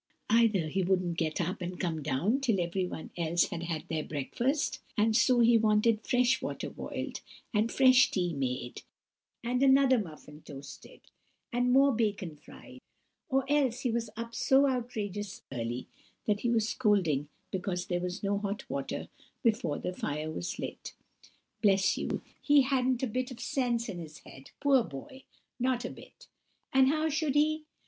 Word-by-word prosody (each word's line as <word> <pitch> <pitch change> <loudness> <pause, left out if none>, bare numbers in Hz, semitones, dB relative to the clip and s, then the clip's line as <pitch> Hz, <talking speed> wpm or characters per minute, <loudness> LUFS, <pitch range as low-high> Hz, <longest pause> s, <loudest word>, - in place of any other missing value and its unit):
Either 220 -7 +4
he 190 +5 -1
wouldn't 180 -2 +1
get 160 -2 -1
up 180 +2 -2
and 180 0 -5
come 165 -3 -1
down 150 - +1
till 235 -8 +1
everyone 175 -1 -3
else 170 0 +2
had 170 - -4
had 165 -2 -4
their 160 -1 -1
breakfast, 240 - -1 0.2
and 215 +1 +3
so 245 +1 +4
he 235 0 +6
wanted 215 0 +3
fresh 250 +1 +2
water - - -4
boiled, - - -5 0.3
and 215 +2 +2
fresh 260 0 +6
tea 175 -3 -1
made, 125 -3 -3 0.6
and 250 +2 0
another 265 -2 +5
muffin 155 -5 -9
toasted, 140 -1 -11 0.5
and 245 +1 +2
more 275 +2 +6
bacon 205 -7 -1
fried; 150 - -14 0.5
or 270 0 +2
else 270 -4 +2
he 250 - 0
was 230 -1 -2
up 230 0 -5
so 270 +4 +4
outrageous 210 -6 -3
early, 120 -1 -3 0.4
that 210 -1 +1
he 240 - 0
was 225 -2 +2
scolding 185 - +1 0.2
because 185 -2 -2
there 175 -1 -1
was 180 +3 -4
no 200 0 +1
hot 205 0 -4
water 140 -1 -4 0.4
before 220 - +1
the 180 - -4
fire 155 -2 -3
was 85 - -4
lit—bless 195 -2 -2
you, - - -3 0.2
he 290 -1 +5
hadn't 260 -1 +1
a - - +2
bit 250 +3 -2
of 250 -2 -9
sense 240 -3 -1
in 190 -5 -5
his 155 -2 -9
head, 135 0 -13
poor 275 -4 +4
boy, 160 - -9 0.4
not 250 0 0
a - - -4
bit! - - -14 0.5
And 265 0 +6
how 310 +3 +2
should 305 -2 0
he? 305 +1 +2
210 Hz, 165 wpm, -30 LUFS, 170-255 Hz, 0.6 s, he